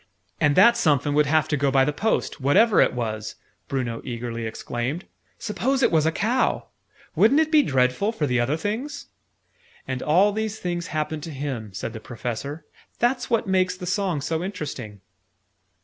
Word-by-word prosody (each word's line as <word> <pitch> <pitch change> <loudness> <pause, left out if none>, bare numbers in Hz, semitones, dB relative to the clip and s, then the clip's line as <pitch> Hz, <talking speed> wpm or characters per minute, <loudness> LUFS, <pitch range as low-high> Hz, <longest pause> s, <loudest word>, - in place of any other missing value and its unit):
"And 150 -1 +3
that 235 +5 +7
somefin 150 - +2
would 150 0 +3
have 155 +1 +2
to 150 - +1
go 140 0 +1
by 135 0 +4
the 150 - -1
post, 215 -4 -1
what 140 +6 +3
ever 225 -1 +5
it - - +3
was!" 110 -3 -4 0.3
Bruno 125 -4 -3
eagerly 115 -2 -4
exclaimed. 120 +8 -4 0.3
"Suppose 260 +5 -1
it - - +4
was 160 -2 +3
a - - +3
cow! 235 +9 0 0.5
Wouldn't 265 +8 +5
it 315 -1 +1
be 310 -2 +6
dreadful 130 - +1
for 190 -10 -2
the 125 -3 +1
other 130 +6 +1
things!" 220 - -4 0.8
"And 130 -1 -3
all 185 +7 +4
these 220 0 -3
things 175 -2 -3
happened 155 -1 -3
to 165 - -7
him," 130 -7 -5
said 95 +4 -5
the 110 - -6
Professor. 125 +6 -6 0.3
"That's 245 +2 0
what 230 -2 +1
makes 185 -1 +1
the 180 - -7
song 185 -4 -1
so 160 +3 -2
interesting." 140 - -6
150 Hz, 180 wpm, -24 LUFS, 130-205 Hz, 0.8 s, that